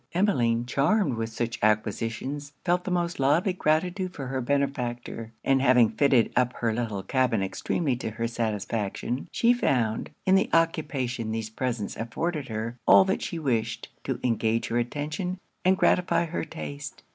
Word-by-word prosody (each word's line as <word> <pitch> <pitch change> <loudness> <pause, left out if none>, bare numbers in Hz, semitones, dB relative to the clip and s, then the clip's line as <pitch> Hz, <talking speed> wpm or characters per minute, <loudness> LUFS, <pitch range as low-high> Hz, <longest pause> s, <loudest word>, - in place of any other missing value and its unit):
Emmeline, 120 - +2
charmed 140 - +2
with 115 -1 -2
such 115 +1 -3
acquisitions, 115 +7 -1
felt 180 0 +1
the - - -2
most 175 -2 -1
lively 155 +8 +3
gratitude 180 +3 0
for 135 - -5
her 130 0 -2
benefactor; 120 -4 -2
and 135 -1 +3
having 125 -4 +5
fitted 135 -5 +3
up 125 0 +2
her 115 -2 -1
little 110 -4 -2
cabin 125 -5 +1
extremely 130 - -1
to 120 - -4
her 115 +2 -2
satisfaction; 115 +1 -2
she 235 +1 +4
found, 120 - 0 0.2
in 190 - +4
the 195 - +4
occupation 135 -8 0
these 110 -1 -3
presents 120 -3 -3
afforded 145 +7 -3
her, 110 +1 -4
all 190 - +8
that 190 - 0
she 170 - -4
wished, 125 -8 -1
to - - -3
engage 115 -1 +1
her 120 - +1
attention; 150 +9 -3 0.3
and 185 +1 +4
gratify 180 -2 +3
her 170 +1 -3
taste. 70 -2 -7
125 Hz, 155 wpm, -27 LUFS, 115-160 Hz, 0.3 s, all